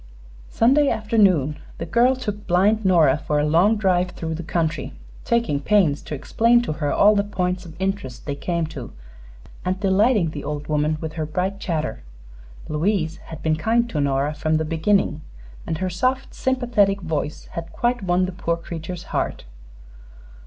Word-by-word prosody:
Sunday 275 +5 +4
afternoon 190 - +2 0.2
the 165 - -4
girl 240 +8 +3
took 210 -5 -5
blind 200 +5 +3
Nora 165 -7 +4
for 150 0 -1
a 145 - +2
long 175 +8 +4
drive 185 -3 +2
through 165 -2 -5
the 160 - -4
country, 160 -3 -2 0.3
taking 235 -12 +1
pains 165 -3 +2
to 150 - -6
explain 230 - +3
to 195 - -2
her 150 -2 -2
all 210 +1 +5
the 200 - +2
points 180 -2 -2
of 165 +1 -13
interest 195 -9 -3
they 145 - -2
came 170 +3 -2
to, 125 -6 -7 0.7
and 185 +1 -1
delighting 200 -2 +3
the 145 -2 -6
old 150 0 -4
woman 150 +1 0
with 160 -1 -5
her 160 -1 -3
bright 185 +5 -2
chatter. 155 - -3 0.7
Louise 165 +1 0
had 160 -2 -9
been 155 -1 +1
kind 230 +8 +1
to 150 - -1
Nora 140 +1 0
from 155 +1 0
the 160 - -1
beginning, 165 0 +1 0.5
and 160 - -2
her 185 +3 -2
soft, 255 +9 -1
sympathetic 240 -7 +1
voice 155 -3 -3
had 170 0 -6
quite 240 0 0
won 180 -1 +2
the 185 - -4
poor 170 -2 -2
creature's 170 +1 -7
heart. - - -2
175 Hz, 170 wpm, -22 LUFS, 155-205 Hz, 0.7 s, all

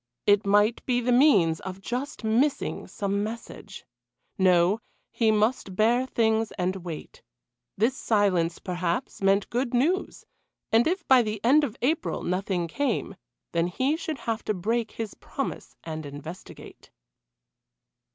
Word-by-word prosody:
It 205 0 +4
might 205 +3 +3
be 245 -1 +2
the 245 +1 0
means 205 - +4
of 190 0 -7
just 245 +6 -5
missing 240 +7 0
some 200 0 -2
message. 215 -2 -8 0.5
No, 185 +2 +3 0.3
he 225 -2 +2
must 215 -2 +1
bear 240 +5 +3
things 225 -3 +1
and 185 +1 -1
wait. 170 -4 -8 0.6
This 235 +6 +1
silence, 185 -6 +1
perhaps, 180 +7 -3
meant 195 +1 +2
good 245 +1 -1
news 340 +10 0 0.5
and 230 +4 +4
if 355 +1 -2
by 260 -2 +7
the 215 -2 -3
end 295 +5 +5
of 250 -4 -3
April 310 +6 0
nothing 180 -1 -1
came, 235 - -2 0.4
then 170 0 +1
he 260 - 0
should 320 -2 -4
have 225 -3 -3
to 215 - 0
break 225 +5 -1
his 225 -2 -5
promise - - -6
and 155 -1 -5
investigate. 145 +5 -10
215 Hz, 140 wpm, -26 LUFS, 185-245 Hz, 0.6 s, by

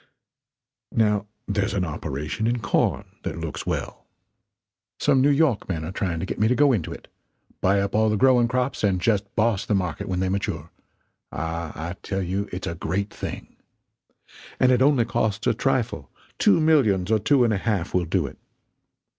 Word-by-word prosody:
Now 105 -2 +2 0.2
there's 100 -1 0
an 95 -2 +1
operation 75 +6 -3
in 120 +1 +1
corn 100 -4 0 0.2
that - - -4
looks - - -5
well. - - -4 0.9
Some 135 - +3
New 140 - +4
York 140 -9 +2
men 80 -4 -2
are 80 - -5
trying 90 -4 -2
to 85 - -2
get - - -5
me 110 - +4
to 125 - +2
go 145 +1 +5
into 95 -9 -2
it - - -9 0.5
buy 100 +2 +3
up 100 0 -2
all 110 +1 +3
the 105 - +1
growing 125 0 +4
crops 125 +1 -1
and 95 -3 +2
just 105 +1 +1
boss 110 -3 +2
the 105 - 0
market 90 -6 -2
when 90 -1 -1
they 95 - 0
mature 80 -5 -3 0.6
ah, 80 0 -4 0.2
I - - -4
tell 95 -1 -2
you 95 +3 -2
it's 90 +1 -5
a - - -3
great 95 +5 -2
thing. - - -7 1.0
And 130 - +5
it 125 0 +3
only 135 -4 +4
costs 110 -2 -1
a 125 - +3
trifle; 120 - -1 0.3
two - - +5
millions 115 - +3
or 110 - +4
two 130 +5 +3
and 115 -2 +2
a - - +1
half 100 -4 -1
will 90 -1 +2
do 85 0 0
it. 65 - -9
100 Hz, 190 wpm, -24 LUFS, 90-120 Hz, 1.0 s, go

